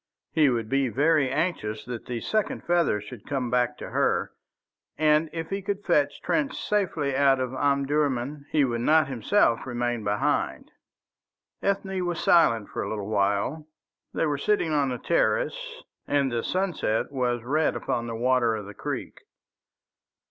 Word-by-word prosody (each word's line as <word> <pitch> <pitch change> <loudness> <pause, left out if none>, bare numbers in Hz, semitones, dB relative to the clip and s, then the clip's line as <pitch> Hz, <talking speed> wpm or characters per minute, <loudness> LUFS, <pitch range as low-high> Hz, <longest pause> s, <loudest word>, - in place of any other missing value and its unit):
He 150 -3 +4
would 115 -3 -1
be 135 +3 +1
very 145 +2 +2
anxious 125 -8 -2
that 120 -2 -7
the 120 -2 -3
second 215 -1 -1
feather 170 -11 +2
should 105 +1 -11
come 130 -4 -2
back 125 -1 +1
to - - -8
her, - - +1 0.7
and 155 +1 +3
if 165 +1 -5
he 195 0 -2
could 200 +1 -4
fetch 150 -6 +1
Trench 285 -4 0
safely 170 -9 0
out 135 -1 +4
of 130 0 -2
Omdurman, 140 0 0
he 150 -3 +3
would 120 -2 -2
not 155 +3 +4
himself 125 - +2
remain 120 -2 -2
behind. 105 0 -1 0.9
Ethne 195 -1 -1
was 175 -1 -2
silent 115 -11 +4
for - - -4
a - - -3
little 105 -1 -4
while. 105 +9 0 0.4
They - - 0
were 145 -2 -1
sitting 190 -4 +1
on 145 -2 +2
the 125 - -2
terrace, - - -1 0.2
and 140 -2 +1
the 120 -1 -1
sunset 180 - -1
was 125 -3 -1
red 150 +5 +1
upon 120 0 -2
the 115 - -4
water 120 -1 +2
of 105 -2 -6
the 105 - -9
creek. - - -5
140 Hz, 160 wpm, -26 LUFS, 120-165 Hz, 0.9 s, He